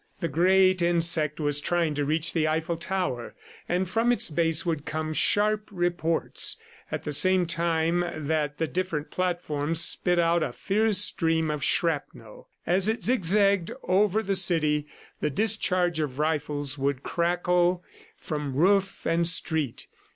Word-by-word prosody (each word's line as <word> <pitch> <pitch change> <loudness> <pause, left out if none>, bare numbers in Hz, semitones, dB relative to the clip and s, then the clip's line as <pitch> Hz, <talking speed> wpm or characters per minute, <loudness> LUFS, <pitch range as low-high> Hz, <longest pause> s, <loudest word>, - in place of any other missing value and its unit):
The 170 - -1
great 185 +3 +3
insect 165 -3 +1
was 145 -1 0
trying 170 -1 0
to 145 0 -1
reach 155 +3 0
the 155 -2 +1
Eiffel 160 +2 -1
Tower, 165 -8 -3 0.3
and 180 +2 0
from 225 +6 +1
its 240 - 0
base 165 +2 +1
would 160 -4 -2
come 155 +1 -3
sharp 210 +5 +1
reports, 175 -3 -1 0.3
at - - -4
the 150 - -4
same 185 +4 +3
time 170 0 0 0.3
that 150 -1 -1
the 165 - 0
different 165 -3 -3
platforms 165 -4 -1
spit 175 +1 +2
out 170 0 +2
a 125 - -2
fierce 215 - 0
stream 160 -5 +2
of 150 -2 -4
shrapnel. 145 -9 -2 0.2
As 185 +3 +1
it 220 +2 -1
zigzagged 200 -5 +2
over 205 +3 +2
the 195 -1 -1
city, 155 -5 +2 0.3
the 150 - 0
discharge 180 -1 +1
of 140 -4 -3
rifles 145 -2 -1
would 140 -1 -1
crackle 175 +1 +1 0.3
from 150 -4 -5
roof 195 +5 +1
and 165 0 +1
street. 160 -6 -1
170 Hz, 145 wpm, -26 LUFS, 155-185 Hz, 0.3 s, great